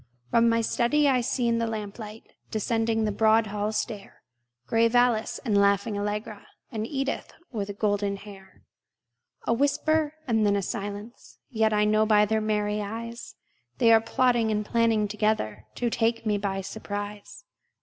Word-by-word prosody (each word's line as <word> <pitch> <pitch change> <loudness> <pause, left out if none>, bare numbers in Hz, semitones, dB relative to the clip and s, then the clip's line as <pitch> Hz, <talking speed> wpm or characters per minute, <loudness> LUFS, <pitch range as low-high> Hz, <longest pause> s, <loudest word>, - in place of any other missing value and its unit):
From 230 0 +4
my 230 0 +2
study 270 +6 +2
I 260 -2 +3
see 245 0 0
in 230 0 +2
the 230 - 0
lamplight, 215 0 -7 0.2
Descending 225 +1 0
the 215 - 0
broad 220 +2 +3
hall 210 +1 -2
stair, 210 -2 -5 0.4
Grave 230 - +2
Alice, 245 -1 +2
and 215 -4 +1
laughing 200 +1 +3
Allegra, 205 0 -4 0.2
And 220 -2 -3
Edith 275 0 -3 0.2
with 205 -3 -4
golden 205 -1 0
hair. 195 -1 -14 0.8
A - - +2
whisper, 300 +4 +1
and 220 -3 +2
then 205 -1 +3
a 200 - 0
silence: 205 +5 -6
Yet 220 -2 +2
I 210 0 +3
know 215 +1 +3
by 210 -1 +5
their 220 +1 0
merry 210 -1 0
eyes 230 +3 -7 0.4
They 230 -1 +5
are 225 - +6
plotting 240 -1 +2
and 210 -1 -1
planning 225 -2 +2
together 210 - -1
To 240 -1 -1
take 230 0 0
me 210 -1 +1
by 195 -1 -2
surprise. 205 - -7
220 Hz, 160 wpm, -26 LUFS, 205-230 Hz, 0.8 s, are